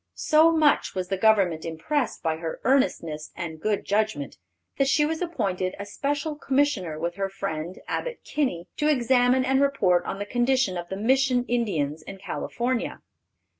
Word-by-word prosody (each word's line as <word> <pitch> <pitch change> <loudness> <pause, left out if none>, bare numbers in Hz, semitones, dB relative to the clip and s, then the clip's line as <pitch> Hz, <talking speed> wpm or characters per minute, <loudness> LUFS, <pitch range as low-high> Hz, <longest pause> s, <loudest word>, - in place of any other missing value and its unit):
So 315 +2 +4
much 310 -9 +2
was 185 -1 -3
the 195 - +1
Government 190 -6 +3
impressed 220 - -2
by 160 -1 0
her 165 0 -5
earnestness 170 - +1
and 160 -2 -6
good 210 -2 -1
judgment, 205 - -1 0.4
that 275 - +3
she 295 +2 +3
was 320 +2 -2
appointed 190 - -2
a 200 - -6
Special 285 +7 -2
Commissioner 270 - 0
with 170 +3 -3
her 195 0 -1
friend, 180 -3 -4
Abbott - - -3
Kinney, 200 - -2
to 300 - +1
examine 255 -2 +3
and 265 +1 +2
report 195 -11 +3
on - - -3
the 205 - -4
condition 245 -2 +1
of 175 0 -5
the 190 - -4
Mission 250 +2 +2
Indians 165 - -1
in 195 +5 -9
California. 235 +5 -3
215 Hz, 165 wpm, -25 LUFS, 175-270 Hz, 0.4 s, So